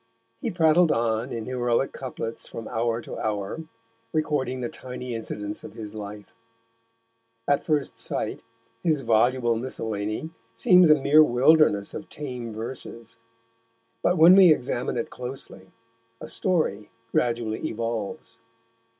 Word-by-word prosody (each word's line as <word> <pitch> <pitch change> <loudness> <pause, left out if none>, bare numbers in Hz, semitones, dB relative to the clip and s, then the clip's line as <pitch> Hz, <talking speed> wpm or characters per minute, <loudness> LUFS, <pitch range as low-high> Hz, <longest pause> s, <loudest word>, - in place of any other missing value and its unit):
He - - -2
prattled 165 -1 +4
on 115 +2 0
in 115 -1 -4
heroic 125 0 0
couplets 120 -3 -6
from 115 - -7
hour 115 0 -1
to - - -8
hour, 105 +9 -3 0.5
recording 140 -5 -1
the 120 - -1
tiny 125 0 -7
incidents 105 -2 -5
of - - -9
his 105 -2 -8
life. 105 -1 -8 1.1
At 145 0 +2
first 150 -4 -1
sight, - - -3 0.4
his 155 -5 +1
voluble 120 +1 +2
miscellany 110 +2 -4 0.2
seems 180 +8 +6
a 155 - +8
mere 150 +2 +6
wilderness 130 -5 +4
of 155 +1 -7
tame 125 -5 -6
verses, 115 0 -8 0.8
but 180 - +2
when 165 +3 +8
we 190 -3 +8
examine 125 -4 0
it 115 - -3
closely 125 -7 -8 0.5
a - - -7
story 155 - 0 0.2
gradually 115 -2 0
evolves. 115 -1 -4
120 Hz, 125 wpm, -25 LUFS, 110-150 Hz, 1.1 s, a